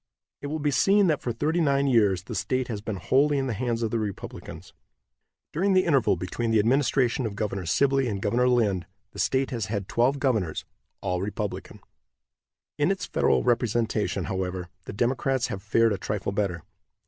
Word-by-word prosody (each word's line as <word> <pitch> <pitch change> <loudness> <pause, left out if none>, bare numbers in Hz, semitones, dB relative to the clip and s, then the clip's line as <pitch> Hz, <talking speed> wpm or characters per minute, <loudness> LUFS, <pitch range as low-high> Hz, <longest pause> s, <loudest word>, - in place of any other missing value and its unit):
It 145 - -4
will 155 +2 -2
be 145 -1 0
seen 195 +9 +4
that 155 -5 +1
for 120 - -2
thirty 155 +9 0
nine 140 -2 +2
years 105 -9 +3
the - - -7
state 130 -1 -1
has 105 -3 -4
been 110 -1 -4
wholly 140 +9 +2
in 135 - 0
the 125 - -2
hands 120 +1 -2
of 110 - -1
the 115 - 0
Republicans. 105 -3 -7 0.8
During 190 +5 +2
the 185 0 +4
interval 140 - +3
between 90 +6 -3
the 110 - +3
administration 125 +2 +2
of 100 - -7
Governor 100 -4 -3
Sibley 135 +6 +2
and 100 -4 -2
Governor 120 +6 +2
Lind 100 -8 +1 0.2
the 100 - -10
state 130 +9 +1
has 115 -6 -2
had 100 -3 -3
twelve 125 +4 +2
governors, 110 - -1 0.4
all 90 -2 -1
Republican. 105 +1 -5 1.0
In 145 - +3
its 195 -2 -1
federal - - +2
representation, 115 -6 0
however, 90 -1 -3 0.2
the - - -7
Democrats 130 +3 0
have 95 - -5
fared 115 +2 +2
a 100 - -4
trifle 105 -1 -3
better. 95 -5 -2
115 Hz, 185 wpm, -26 LUFS, 100-135 Hz, 1.0 s, seen